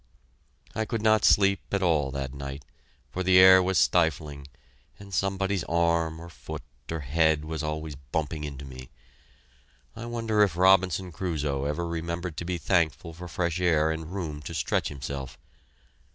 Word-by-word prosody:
I 110 - -1
could 110 0 -3
not 110 -1 +4
sleep 100 -1 +4
at 100 -1 0
all 75 -6 +2
that 70 -1 -4
night, 70 0 -7 0.5
for 95 - -3
the 95 0 +4
air 95 0 +9
was 95 +1 0
stifling, 75 -4 +1 0.5
and 100 -1 -12
somebody's 95 +1 0
arm 85 -1 +1
or 85 - -9
foot 85 - -8 0.3
or 80 -1 -3
head 80 +2 +2
was 80 -1 -4
always 75 0 -4
bumping 75 +3 -4
into 70 -1 -6
me. 65 -1 -10 1.1
I 120 - -7
wonder 115 -3 0
if 95 -5 +3
Robinson 95 -1 +3
Crusoe 75 -6 -2
ever 80 +4 -2
remembered 85 0 -4
to 85 - -4
be 90 0 -2
thankful 85 -3 0
for 90 +2 -9
fresh 85 0 -2
air 80 -3 +3
and 80 +1 -5
room 80 -6 -4
to 75 - -7
stretch - - 0
himself! 65 -2 -6
80 Hz, 160 wpm, -27 LUFS, 75-95 Hz, 1.1 s, air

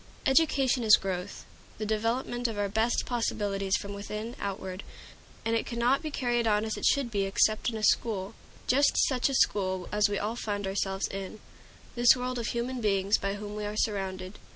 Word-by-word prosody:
Education 270 -3 +3
is 215 -1 +8
growth, 190 0 -5 0.3
the 215 - -3
development 235 +3 -1
of 225 -2 -5
our 205 0 0
best 220 +4 +1
possibilities 200 -5 -1
from 200 0 -7
within 210 +3 -6
outward; 190 -1 -4 0.6
and 225 0 +1
it 225 - -1
cannot 240 +3 +1
be 315 - -4
carried 240 -4 0
on 210 0 +2
as 220 - -2
it - - -4
should 275 -4 +2
be 200 -2 0
except 215 +4 +2
in 225 - -4
a 215 - -6
school, 205 -4 +1 0.3
just 280 +3 +3
such 260 0 +1
a 275 - -1
school 185 -6 +1
as 210 0 +3
we 205 - -1
all 215 +3 -2
find 205 -4 -3
ourselves 195 0 -1
in 195 +2 -6 0.5
this 240 +1 +6
world 250 0 -3
of 230 - -2
human 245 +1 -2
beings 200 -1 +2
by 200 0 -2
whom 205 0 -7
we 210 - -4
are 210 +1 -4
surrounded. 190 -3 -2
215 Hz, 190 wpm, -29 LUFS, 200-240 Hz, 0.6 s, is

